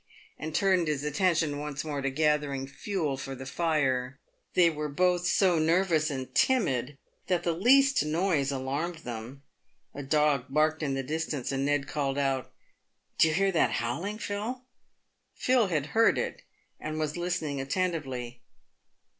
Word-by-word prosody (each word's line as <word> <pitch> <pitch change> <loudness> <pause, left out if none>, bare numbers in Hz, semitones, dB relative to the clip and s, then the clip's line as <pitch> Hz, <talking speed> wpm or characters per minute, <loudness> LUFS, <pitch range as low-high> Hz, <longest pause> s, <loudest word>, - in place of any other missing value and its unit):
and 155 0 -5
turned 185 -3 +3
his 150 -2 -1
attention 155 -1 +1
once 145 0 -4
more 145 -2 -3
to 135 - 0
gathering 145 -1 0
fuel 150 0 -3
for 135 0 -6
the 135 - -8
fire. 135 -4 0 0.4
They 180 -2 +6
were 150 -2 -2
both 180 +3 +1
so 180 -2 +3
nervous 165 -1 +2
and 130 -3 -5
timid, 145 - +1 0.3
that 180 -2 +1
the 170 - +1
least 270 - +4
noise 155 -3 +1
alarmed 145 +6 -3
them. 120 +4 -7 0.5
A 145 - -6
dog 145 -2 +2
barked 155 +3 +2
in 140 -3 -1
the 135 - -2
distance, 150 -2 -3
and 135 +1 -1
Ned 145 -1 0
called 140 -2 -2
out, 135 -2 -1 0.7
"Do - - +7
you 155 - 0
hear 195 +1 +2
that 170 - +2
howling, 170 - -2
Phil 225 +5 -4 0.3
?" - - -49
Phil 250 -4 +2
had 155 -6 -1
heard 225 0 +4
it, - - -3 0.4
and 155 0 -4
was 155 -1 -2
listening 175 -5 -2
attentively. 135 -6 -3
150 Hz, 155 wpm, -28 LUFS, 135-175 Hz, 0.7 s, Do